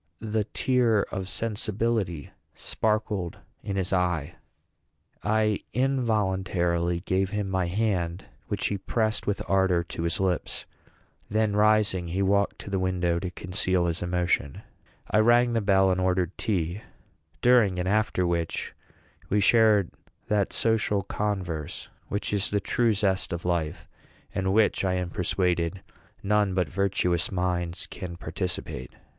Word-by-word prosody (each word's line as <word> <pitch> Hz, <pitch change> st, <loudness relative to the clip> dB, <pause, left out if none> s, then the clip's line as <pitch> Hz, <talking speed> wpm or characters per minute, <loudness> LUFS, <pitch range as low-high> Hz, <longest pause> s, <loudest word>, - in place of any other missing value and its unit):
The 110 Hz, -1 st, -1 dB
tear 120 Hz, -3 st, +2 dB
of 95 Hz, 0 st, -4 dB
sensibility 110 Hz, -, -1 dB, 0.2 s
sparkled 105 Hz, -5 st, -1 dB, 0.2 s
in 100 Hz, -, -4 dB
his 95 Hz, -1 st, 0 dB
eye. 90 Hz, -3 st, 0 dB, 0.9 s
I 105 Hz, 0 st, +2 dB
involuntarily 95 Hz, -9 st, +1 dB
gave 95 Hz, 0 st, 0 dB
him 105 Hz, -1 st, -2 dB
my 95 Hz, -2 st, 0 dB
hand, 90 Hz, -3 st, -1 dB, 0.2 s
which -, -, -2 dB
he 100 Hz, -, -1 dB
pressed 110 Hz, +2 st, -1 dB
with 100 Hz, -, -1 dB
ardor 95 Hz, -3 st, +3 dB
to 85 Hz, -, -6 dB
his 85 Hz, +1 st, -1 dB
lips; 95 Hz, -3 st, -1 dB, 0.6 s
then, 110 Hz, -1 st, +1 dB
rising, 105 Hz, -4 st, +3 dB
he 95 Hz, +4 st, -1 dB
walked 100 Hz, +1 st, +2 dB
to 100 Hz, -, -8 dB
the 95 Hz, -, 0 dB
window 90 Hz, -2 st, 0 dB
to 90 Hz, -, -3 dB
conceal 90 Hz, 0 st, 0 dB
his 85 Hz, 0 st, -2 dB
emotion. 90 Hz, -5 st, -1 dB, 0.5 s
I 105 Hz, -, +4 dB
rang 120 Hz, +2 st, +4 dB
the 115 Hz, -, +1 dB
bell 95 Hz, -2 st, +4 dB
and 95 Hz, 0 st, 0 dB
ordered 90 Hz, -1 st, +1 dB
tea, 90 Hz, -1 st, -1 dB, 0.6 s
during 120 Hz, -7 st, +5 dB
and 90 Hz, 0 st, -1 dB
after 105 Hz, -2 st, +1 dB
which 85 Hz, -1 st, -2 dB, 0.6 s
we 105 Hz, -, +2 dB
shared 105 Hz, -2 st, +4 dB, 0.4 s
that 105 Hz, -2 st, +1 dB
social 110 Hz, -3 st, +1 dB
converse 90 Hz, -7 st, -3 dB, 0.2 s
which 100 Hz, +1 st, -2 dB
is 100 Hz, 0 st, 0 dB
the 100 Hz, -, +1 dB
true 115 Hz, +3 st, +1 dB
zest 95 Hz, -2 st, 0 dB
of 85 Hz, -1 st, -4 dB
life, 85 Hz, -2 st, -1 dB, 0.5 s
and 95 Hz, -1 st, -1 dB
in 95 Hz, -, +2 dB
which 110 Hz, -1 st, +3 dB
I 95 Hz, -1 st, +1 dB
am 90 Hz, -1 st, -2 dB
persuaded 90 Hz, -1 st, 0 dB, 0.4 s
none 105 Hz, -2 st, +2 dB
but 90 Hz, -5 st, +1 dB
virtuous 90 Hz, -2 st, 0 dB
minds 90 Hz, -2 st, -1 dB
can 90 Hz, -2 st, -7 dB
participate. 85 Hz, -9 st, -4 dB
95 Hz, 140 wpm, -27 LUFS, 90-105 Hz, 0.9 s, during